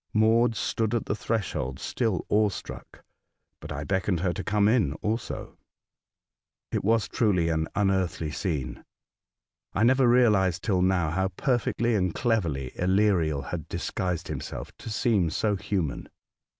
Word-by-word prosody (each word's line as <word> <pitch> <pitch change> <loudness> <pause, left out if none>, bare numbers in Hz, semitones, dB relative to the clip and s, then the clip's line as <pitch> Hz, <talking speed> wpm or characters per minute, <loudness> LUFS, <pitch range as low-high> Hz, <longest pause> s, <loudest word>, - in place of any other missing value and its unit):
Maud 115 +2 +4
stood 110 +1 -1
at 115 - -1
the - - -1
threshold 80 - -2
still 110 -7 -1
awe 105 0 +3
struck, 95 - -9 0.6
but - - -9
I 75 0 -4
beckoned 90 +2 0
her 90 -2 +1
to - - -5
come 105 -1 +2
in 110 - +3
also. 110 +8 -4 1.1
It - - -1
was 110 +2 +2
truly 95 -8 +1
an 80 -1 0
unearthly 95 -6 0
scene. 75 - -3 0.9
I 105 - +1
never 130 +2 +4
realised 105 -8 +3
till 95 -5 +1
now 90 -4 +2
how 95 +3 +1
perfectly 120 +3 0
and 90 -5 0
cleverly 85 - 0
Aleriel 90 -6 +2
had 80 -4 -5
disguised 90 -2 -3
himself - - -6
to - - -7
seem 105 -5 +1
so 105 +6 0
human. 95 -6 -3
95 Hz, 140 wpm, -27 LUFS, 85-110 Hz, 1.1 s, Maud